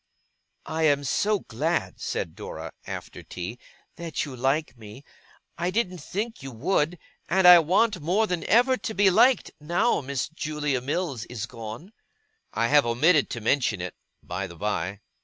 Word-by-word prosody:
'I 160 0 -2
am 145 -1 +2
so 205 +8 +1
glad,' 155 +9 -2
said 80 - -3
Dora, - - -7 0.2
after - - -7
tea, 90 +7 -7 0.4
'that 170 -2 -3
you 140 -3 -8
like 135 +4 0
me. 110 +3 -12 0.6
I 175 +1 0
didn't 185 -3 -1
think 215 +9 -4
you 135 - -6
would; 155 +6 0 0.3
and 190 -1 +4
I 180 -1 +11
want, 185 +5 +2
more 185 +8 +2
than 180 -5 -2
ever, 250 +3 +4
to 220 - -5
be 195 0 +5
liked, 250 +7 +4
now 175 +10 +1 0.3
Julia 150 -4 -2
Mills 140 - -2
is 115 -3 -5
gone.' 115 - -9 0.6
I 115 - 0
have 145 0 +6
omitted 145 +6 +3
to 115 - -5
mention 115 -3 +1
it, 90 +1 -5 0.3
by 90 +2 -4
the 85 - -11
by. 100 +1 -3
150 Hz, 160 wpm, -26 LUFS, 120-180 Hz, 0.6 s, I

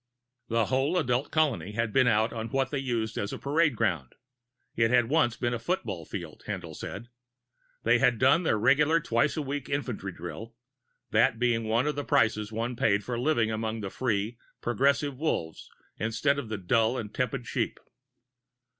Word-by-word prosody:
The 115 -1 +1
whole 135 - +1
adult 125 -3 0
colony 140 - 0
had 115 -1 -1
been 130 -2 +4
out 110 0 +2
on 115 -1 -4
what 135 -1 0
they 140 - -1
used 115 -4 -2
as 100 - -3
a - - -4
parade 150 -1 +1
ground 85 - -1 0.6
it 115 -1 +3
had 120 -1 +3
once 140 -6 +2
been 120 -1 -1
a 120 - -2
football 115 - -3
field, - - -7
Haendl - - -5
said. 115 +5 -7 0.7
They - - +4
had 125 -3 +3
done 135 +8 +4
their 135 -11 +1
regular 145 +8 +4
twice 140 +1 +1
a 155 - -1
week 140 -1 -4
infantry 125 -9 -3
drill, 100 +7 -8 0.6
that 115 - +3
being 115 -1 +1
one 115 +4 +1
of 150 - 0
the 145 - -3
prices 110 -3 +1
one 115 +3 -2
paid 100 -3 +2
for 120 +1 -3
living 120 -5 +2
among 110 0 -3
the 100 -2 -5
free, 115 -1 -1 0.2
progressive 140 +3 +1
Wolves 80 - -2 0.3
instead 115 +6 +1
of 120 -6 -6
the 110 - -2
dull 110 +6 +2
and 105 -3 -5
tepid 125 -1 -2
sheep. - - -2
120 Hz, 180 wpm, -28 LUFS, 110-135 Hz, 0.7 s, been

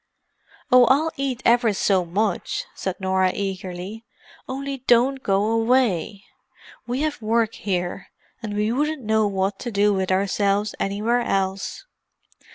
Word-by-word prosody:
"Oh, 250 -1 +8
I'll 285 +6 +3
eat 270 -3 -3
ever 235 -2 +4
so 190 -2 +1
much," 195 +2 -1
said 190 -2 -4
Norah 190 -1 +1
eagerly. 195 +2 -5 0.5
"Only 275 +1 -4
don't 255 +3 +4
go 195 -2 +1
away: 225 -4 +1 0.6
we 250 +3 -2
have 305 -5 -2
work 225 0 +1
here, 180 -3 -3 0.3
and 210 -3 -5
we 210 +1 0
wouldn't 295 +2 -1
know 220 -1 +2
what 195 0 -1
to 245 - -4
do 205 -1 +2
with 190 -1 -1
ourselves 200 +2 +1
anywhere 215 +5 0
else. 195 - -2
210 Hz, 135 wpm, -23 LUFS, 195-245 Hz, 0.6 s, Oh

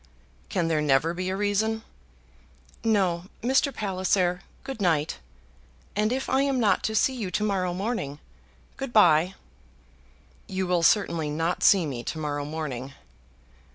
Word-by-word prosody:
"Can 175 -5 0
there 160 -2 +1
never 150 +3 +2
be 185 +1 -3
a 190 - -1
reason?" 210 +2 0 1.0
"No, 190 -6 +1 0.2
Mr. 265 +3 +3
Palliser. 185 -4 0 0.2
Good 270 -5 -6
night; 160 - +1 0.8
and 210 +2 +1
if 265 +1 -2
I 265 +1 +2
am 275 -2 +1
not 215 -4 +3
to 220 - -1
see 260 +5 +3
you 225 -7 -4
to 210 - -1
morrow 190 -4 0
morning, 185 - -3 0.6
good 270 -2 -5
bye." 180 -3 +5 1.1
"You 190 0 -2
will 180 -1 +1
certainly 165 -4 +2
not 165 +4 -1
see 190 -4 +5
me 125 -5 -4
to - - -4
morrow 145 -2 -3
morning." 140 -4 -5
185 Hz, 145 wpm, -26 LUFS, 160-215 Hz, 1.1 s, bye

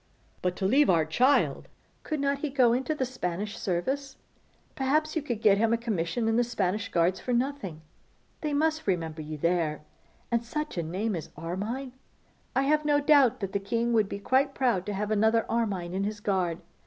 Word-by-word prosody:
'But 180 0 0
to 190 - -3
leave 275 +9 +4
our 165 -3 +4
child!' 250 - +2 0.3
'Could 310 -2 -3
not 280 0 0
he 300 - -2
go 255 -4 +4
into 265 +5 -1
the 265 - -1
Spanish 205 -5 -4
service? 265 +10 -2 0.6
Perhaps 305 +4 0
you 320 - +1
could 240 -6 -4
get 205 -1 +5
a 230 0 +3
commission 220 -1 -1
in 225 0 +2
the 245 - +4
Spanish 215 -3 -1
Guards 170 +2 +1
for 250 - -2
nothing. 240 - -2 0.6
They 300 - -2
must 315 0 0
remember 165 -4 -1
you 155 0 -6
there. 165 -1 0 0.5
And 235 0 +1
such 300 +6 -4
a 175 - -1
name 190 +6 -2
as 165 - -6
Armine! 210 - -4 0.6
I 265 - +3
have 300 +2 +2
no 295 -1 +3
doubt 285 -6 +4
that 195 -1 -3
the 200 - +1
king 230 +4 -1
would 215 -3 +3
be - - -4
quite 265 +7 +1
proud 235 -9 +1
to 205 - -2
have 210 +2 -2
another 220 +2 +3
Armine 200 -7 -1
in 195 +1 -1
his 210 +1 -3
guard. 185 -5 0
225 Hz, 190 wpm, -28 LUFS, 185-270 Hz, 0.6 s, get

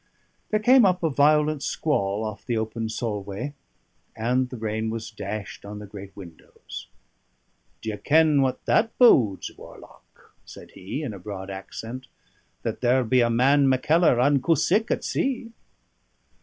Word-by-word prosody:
There 215 - +1
came 250 +4 +6
up 180 -3 +2
a 160 - +1
violent 150 +1 +3
squall 105 -10 -1
off 105 -2 -6
the 120 -2 -2
open 110 0 -3
Solway, 105 +2 -4 0.6
and 125 +3 0
the 125 - -7
rain 110 0 -2
was 110 0 -5
dashed 105 -1 -6
on 105 +1 -8
the 105 - -8
great 100 -1 -11
windows. 85 -9 -11 1.0
"Do 110 - -3
ye 105 - -6
ken 155 +1 +3
what 130 -1 -1
that 225 0 +1
bodes, 120 - +4
warlock?" - - -16
said - - -13
he, 100 +11 -6
in 125 -7 -4
a 100 - -9
broad 95 0 -7
accent: 115 +6 -8 0.6
"that - - -4
there'll 125 +1 +3
be 125 +3 +3
a 120 - +3
man 135 +4 +4
Mackellar 150 +1 +3
unco 140 +5 +3
sick 205 - +1
at - - -1
sea." 250 -4 -2
120 Hz, 155 wpm, -25 LUFS, 105-150 Hz, 1.0 s, came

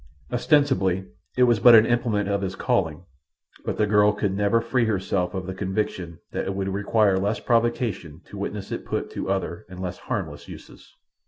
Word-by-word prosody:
Ostensibly 125 - +2 0.3
it 125 - +5
was 120 -3 +4
but 120 +3 +8
an 110 0 +7
implement 115 -4 0
of 100 0 0
his 95 -1 -3
calling; 80 -1 -1 0.6
but - - -2
the 105 - +3
girl 105 0 +4
could 105 -2 -1
never 105 +3 +2
free 115 +1 0
herself 95 -3 -1
of 95 -1 -3
the 95 - -4
conviction 95 -3 -3
that - - -3
it 95 - -3
would 95 0 -2
require 100 0 +2
less 100 +3 -1
provocation 115 - 0
to - - -12
witness 100 0 -5
it - - -4
put - - -3
to - - -4
other 95 -3 -2
and 90 0 -10
less 90 -1 -5
harmless - - -5
uses. - - -13
100 Hz, 185 wpm, -24 LUFS, 95-115 Hz, 0.6 s, but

